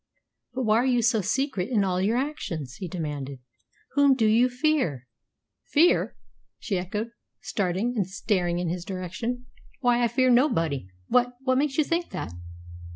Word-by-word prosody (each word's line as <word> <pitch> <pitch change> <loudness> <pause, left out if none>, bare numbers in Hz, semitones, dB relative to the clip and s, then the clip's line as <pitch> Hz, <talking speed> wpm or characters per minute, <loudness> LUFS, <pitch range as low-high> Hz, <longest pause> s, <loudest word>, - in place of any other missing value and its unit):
"But 260 - -1
why 215 -1 +3
are 240 - +2
you 245 -2 +2
so 225 -2 +3
secret 215 0 -1
in 220 -6 +2
all 185 -1 0
your 215 +5 +2
actions?" 185 - -3
he 185 - -5
demanded. 145 -5 -4 0.5
"Whom 280 -1 +5
do 230 -4 +2
you 230 +4 +4
fear?" 245 - 0 0.6
"Fear!" 330 +4 +3 0.4
she 195 -4 -2
echoed, 210 +6 -4 0.3
starting 200 +5 -1
and 200 -5 0
staring 185 -3 0
in 175 0 -1
his 175 +1 -3
direction. 195 +7 -4 0.4
"Why, 245 -1 +3
I - - +4
fear 255 +2 +3
nobody! 165 - +2 0.2
What 245 0 +2
what 260 0 +2
makes 280 -1 0
you 310 - +5
think 335 +3 -1
that?" 180 - -5
220 Hz, 160 wpm, -26 LUFS, 180-255 Hz, 0.6 s, Whom